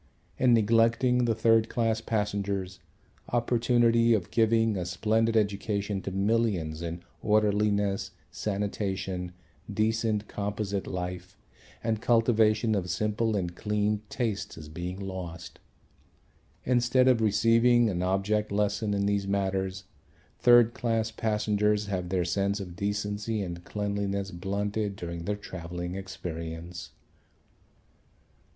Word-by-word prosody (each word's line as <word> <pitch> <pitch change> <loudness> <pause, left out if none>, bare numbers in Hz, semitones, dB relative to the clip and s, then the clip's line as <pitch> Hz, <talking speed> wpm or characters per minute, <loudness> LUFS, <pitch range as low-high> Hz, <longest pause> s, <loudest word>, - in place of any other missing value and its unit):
In 125 -2 +5
neglecting 115 +3 +3
the 115 -2 +1
third 115 0 +3
class 115 -1 0
passengers, 100 -4 -2 0.5
opportunity 115 -1 +3
of 90 -5 -3
giving 115 -1 +3
a 90 - -2
splendid 110 +6 +1
education 100 -1 -1
to - - -4
millions 95 -6 0
in 85 +1 -5 0.2
orderliness, 105 -2 +1 0.2
sanitation, 95 -3 -3 0.4
decent 110 -1 0
composite 100 -1 -3
life 90 +1 -5 0.5
and 110 -1 -1
cultivation 115 -2 +3
of 95 -3 -1
simple 105 +4 0
and 90 -3 -2
clean 105 +1 0
tastes 110 -9 -3
is 75 -2 -9
being 90 +4 -5
lost. 90 -3 -7 1.0
Instead 125 +1 +3
of 125 -3 +4
receiving 115 +3 +4
an 90 -4 -1
object 100 +3 0
lesson 105 +1 0
in 100 0 0
these 100 -1 0
matters 95 -1 -1 0.6
third 120 -1 +6
class 115 -2 -1
passengers 105 -1 +1
have 90 -3 -3
their 90 -2 0
sense 100 +3 0
of 90 -3 -7
decency 105 +2 -2
and 85 -1 -6
cleanliness 100 -1 -2
blunted 100 +3 -2
during 85 -2 -6
their 105 - -1
travelling 90 -3 -6
experience. 85 -2 -6
105 Hz, 115 wpm, -28 LUFS, 95-110 Hz, 1.0 s, third